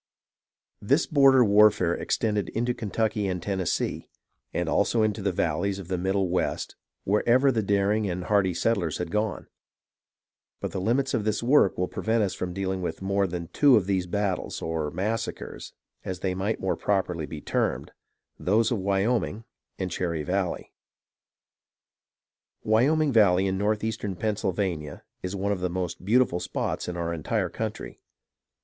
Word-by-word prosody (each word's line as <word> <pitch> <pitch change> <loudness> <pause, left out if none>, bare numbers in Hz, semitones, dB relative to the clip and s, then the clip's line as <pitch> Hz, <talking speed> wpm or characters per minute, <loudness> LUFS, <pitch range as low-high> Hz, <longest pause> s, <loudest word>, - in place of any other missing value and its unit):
This 140 +10 +2
border 135 -4 +5
warfare 100 -4 +5
extended 105 0 -1
into 120 +2 -1
Kentucky 110 -2 -1
and 90 -1 -2
Ten 95 +2 -3
nessee, 90 - -2 0.4
and 85 -1 -2
also 105 +6 +2
into 105 -1 0
the 100 0 0
valleys 90 +3 -1
of 95 -3 -9
the 90 - 0
Middle 95 +1 +1
West 90 +1 -2 0.3
wher 105 +2 +2
ever 130 +3 +5
the 115 -3 0
daring 100 +1 +1
and 90 0 -3
hardy 95 -3 +2
settlers 95 -9 0
had 90 -2 -4
gone; 105 -4 -1 1.1
but - - -4
the 95 - -3
limits 130 +7 +1
of 110 - 0
this 110 +1 -1
work 125 -5 +4
will 90 - 0
prevent 110 +3 0
us 95 - -1
from 90 - -4
dealing 95 0 -2
with 90 - -4
more 100 0 +1
than 85 -1 -5
two 140 +7 +5
of 105 -5 +3
these 95 -2 0
battles, 100 0 -2
or 80 -2 -2
massacres, 110 +7 -4 0.3
as 95 -1 -5
they 95 -1 0
might 100 +4 -2
more 95 - 0
prop 100 -2 +1
erly 85 -5 -5
be 75 - -6
termed, - - -1 0.3
— - - -50
those 110 +4 +3
of 115 - 0
Wyoming 100 +3 0 0.3
and 95 -1 -3
Cherry 85 -4 -2
Valley. 90 +1 -2 1.9
Wyoming 140 +7 +3
Valley 100 -5 +4
in 95 -1 0
northeastern 105 0 -1
Pennsylvania 95 -7 -2 0.2
is 90 +2 -4
one 100 +1 -1
of 100 - -1
the 90 0 -1
most 90 -1 -4
beautiful 110 -3 +3
spots - - -3
in 90 -1 -4
our 85 0 -2
entire 90 +4 -1
country. 110 +2 -5
100 Hz, 165 wpm, -26 LUFS, 90-110 Hz, 1.9 s, border